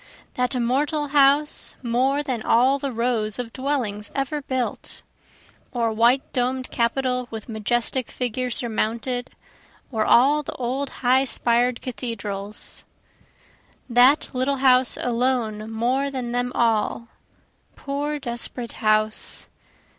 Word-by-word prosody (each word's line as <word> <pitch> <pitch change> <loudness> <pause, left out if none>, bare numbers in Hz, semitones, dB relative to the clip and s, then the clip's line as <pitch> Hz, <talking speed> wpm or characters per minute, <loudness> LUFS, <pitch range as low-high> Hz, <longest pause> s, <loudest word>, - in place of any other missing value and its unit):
That 250 +1 -1
immortal 285 +5 0
house 285 +1 +3
more 260 +4 +1
than 255 -6 -3
all 255 +5 +3
the 275 -1 -3
rows 230 -3 0
of 245 -2 -5
dwellings 245 -7 -2
ever 280 +2 -2
built! 260 -2 -4 0.7
Or 230 -2 0
white 235 +4 +2
domed 255 +1 -1
capitol 250 +1 0
with 220 -2 -7
majestic 240 +3 0
figure 250 0 -2
surmounted, 235 +1 +1 0.6
or 220 -3 0
all 275 +7 +5
the 295 - -7
old 260 +3 -3 0.2
high 260 +2 +4
spired 240 -1 +1
cathedrals, 215 -5 -4 1.0
That 250 +4 +4
little 260 +2 0
house 255 -1 +4
alone 235 -3 -1
more 250 +5 0
than 255 -3 -4
them 245 +1 -1
all 230 0 0 0.7
poor, 290 +2 -3
desperate 240 -2 -5
house! 215 0 0
250 Hz, 115 wpm, -23 LUFS, 230-265 Hz, 1.0 s, all